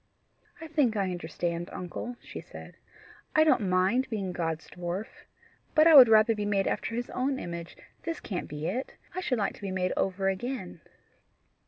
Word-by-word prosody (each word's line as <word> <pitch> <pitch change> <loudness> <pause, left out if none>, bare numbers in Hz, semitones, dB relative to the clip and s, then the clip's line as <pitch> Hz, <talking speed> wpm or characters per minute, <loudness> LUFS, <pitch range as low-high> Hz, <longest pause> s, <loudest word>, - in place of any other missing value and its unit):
"I 325 - -8
think 290 -8 +1
I 195 -2 0
understand, 175 0 -3
uncle," 180 +7 -6
she - - -8
said. - - -11 0.6
"I 310 - +7
don't 250 -11 +3
mind 190 +8 +2
being 200 -5 -2
God's 165 -2 -3
dwarf. 175 +4 -4 0.7
But 310 0 +7
I 330 - +7
would 260 -5 +11
rather 220 +1 +6
be 210 -1 -3
made 200 -2 +1
after 230 - -2
his 245 +1 -3
own 265 +2 -1
image; 170 -4 -6 0.2
this 330 -1 -4
can't 185 -4 -4
be 150 +1 -6
it. 245 +10 -3 0.2
I 370 - -3
should 265 -9 0
like 205 - 0
to - - -16
be 200 - -4
made 185 -1 -1
over 195 0 0
again." 195 -3 -3
200 Hz, 180 wpm, -29 LUFS, 180-250 Hz, 0.7 s, would